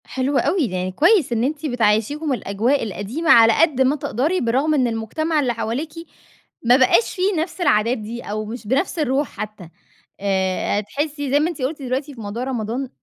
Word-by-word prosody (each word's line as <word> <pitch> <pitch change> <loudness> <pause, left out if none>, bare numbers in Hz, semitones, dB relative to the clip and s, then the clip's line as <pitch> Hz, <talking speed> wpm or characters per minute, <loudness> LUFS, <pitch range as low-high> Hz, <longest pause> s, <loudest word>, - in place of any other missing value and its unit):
حلو 265 +2 -1
أوي، 345 -6 +1
يعني 185 -3 -3
كويس 330 - +3
إن 230 0 0
أنتِ 290 +3 -2
بتعيّشيهم 245 +4 +1
الأجواء 235 +4 0
القديمة 225 - -1
على 230 -1 +7
قد 305 -6 +3
ما 265 +2 +3
تقدري، 300 - -1
برغم 265 +7 +1
إن 260 -4 +2
المجتمع 300 +8 -1
اللي 255 -4 0
حواليكِ 235 +7 -3 0.7
ما 245 +2 +5
بقاش 265 - +3
فيه 380 +1 +1
نفْس 350 +2 -5
العادات 230 -5 +2
دي 225 +2 -7
أو 215 0 -4
مش 225 0 -8
بنفْس 280 - 0
الروح 280 -1 +1
حتى 210 -5 -8 0.5
آآ، 190 0 0
تحسّي 290 +4 -4
زي 285 - +4
ما 310 +3 +1
أنتِ 325 -5 -7
قُلتِ 285 +3 -3
دلوقتي 265 +3 -3
في 235 - -10
موضوع 210 +4 -4
رمضان، 250 0 -3
255 Hz, 180 wpm, -21 LUFS, 220-300 Hz, 0.7 s, على